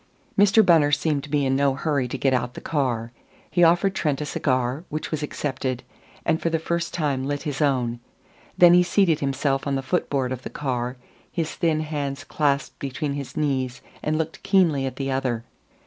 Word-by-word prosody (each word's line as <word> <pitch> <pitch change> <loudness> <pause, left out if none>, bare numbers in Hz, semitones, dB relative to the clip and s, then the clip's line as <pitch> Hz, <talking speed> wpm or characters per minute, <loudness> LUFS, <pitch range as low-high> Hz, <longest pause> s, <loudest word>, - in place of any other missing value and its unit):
Mr. 205 +2 +5
Bunner 160 -5 +5
seemed 145 0 +1
to 150 - -9
be 145 -1 +1
in 135 0 +2
no 140 -1 +2
hurry 140 -3 0
to 130 - -4
get 135 0 +2
out 125 -1 -1
the - - -6
car. 120 -6 -1 0.4
He 175 +2 +3
offered 175 +3 +4
Trent 150 -7 0
a 150 - -2
cigar, 130 0 0
which 155 +1 -4
was 155 -2 -2
accepted, 130 -4 -3 0.4
and 160 -1 +1
for 165 - +1
the 165 - +1
first 170 +1 -2
time 140 -5 -1
lit 145 0 -2
his 150 -2 -3
own. 125 -5 +1 0.6
Then 175 -1 +8
he 180 - +7
seated 175 -3 +3
himself 135 0 0
on 140 - 0
the 135 - -2
foot 175 +7 -1
board 130 -3 0
of 130 -1 -4
the - - -6
car, 125 -3 -3 0.3
his 165 -3 -2
thin 160 -2 +1
hands 145 -3 -3
clasped 145 -2 -1
between 140 +2 -3
his 140 -2 -6
knees, 130 -4 -1 0.2
and 155 0 0
looked 160 0 -3
keenly 175 -9 +3
at 130 - -5
the 135 -1 -2
other. 130 -4 -1
145 Hz, 200 wpm, -24 LUFS, 130-160 Hz, 0.6 s, Then